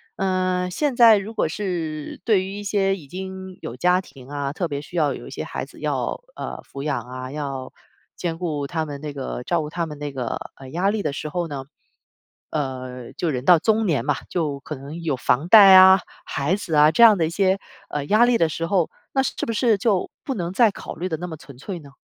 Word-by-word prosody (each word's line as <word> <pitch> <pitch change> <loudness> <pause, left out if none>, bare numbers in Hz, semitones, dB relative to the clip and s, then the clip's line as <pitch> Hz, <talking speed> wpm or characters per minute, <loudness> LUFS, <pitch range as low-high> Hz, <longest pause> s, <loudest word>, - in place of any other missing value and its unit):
呃， 185 -1 0
现 285 - 0
在 230 -3 +7
如 215 +3 -8
果 - - +1
是 165 -4 -4
对 210 -5 +3
于 190 - -6
一 205 - -6
些 195 -1 +1
已 160 -7 -12
经 190 +2 -7
有 115 - -6
家 180 +6 +3
庭 135 -8 -15
啊， 140 -1 -3
特 175 +2 -2
别 145 -2 -4
需 170 +4 -8
要 150 -3 +2
有 - - -9
一 - - -8
些 - - -5
孩 - - -5
子 - - -16
要， - - -2 0.2
呃， - - -6
抚 140 - -5
养 150 - -1
啊， 130 +1 -7
要 135 -3 -5 0.4
兼 165 -2 -3
顾 150 -5 -2
他 160 0 -2
们 145 -2 -7
那 150 -1 -5
个 135 -3 -5
照 170 +4 0
顾 150 - -5
他 170 0 -2
们 150 -1 -8
那 145 -1 -5
个， 125 -3 -3 0.2
呃， 135 -1 -11
压 175 +7 +1
力 215 0 -1
的 150 - -1
时 155 - -5
候 175 +1 -2
呢， 140 -3 -5 0.9
呃， 130 -4 -4
就 175 - -2
人 125 -1 -3
到 175 +1 +8
中年 195 - +1
嘛， 145 -1 +2
就 150 -6 -2
可 155 - -7
能 145 +5 -8
有 160 -5 0
房 135 +5 +1
贷 200 -2 +9
啊、 190 0 +9 0.3
孩 145 +6 0
子 190 -6 -3
啊 150 +1 +6
这 165 - +1
样 220 -3 +8
的 165 - +2
一 - - -2
些， 190 +1 +2 0.3
呃， 145 -1 -3
压 215 +9 +4
力 240 -1 +3
的 165 - +3
时 165 +1 -3
候， 180 -3 +1 0.2
那 270 -1 +2
是 - - -2
不 230 - -1
是 225 -1 +3
就 200 -3 +1
不 270 - -3
能 175 -2 -3
再 230 +2 +5
考 - - -8
虑 180 +3 -3
得 160 - -2
那 175 - -5
么 160 - -6
纯粹 145 +7 -8
呢？ 145 -3 -14
165 Hz, 255 characters per minute, -23 LUFS, 145-190 Hz, 0.9 s, 贷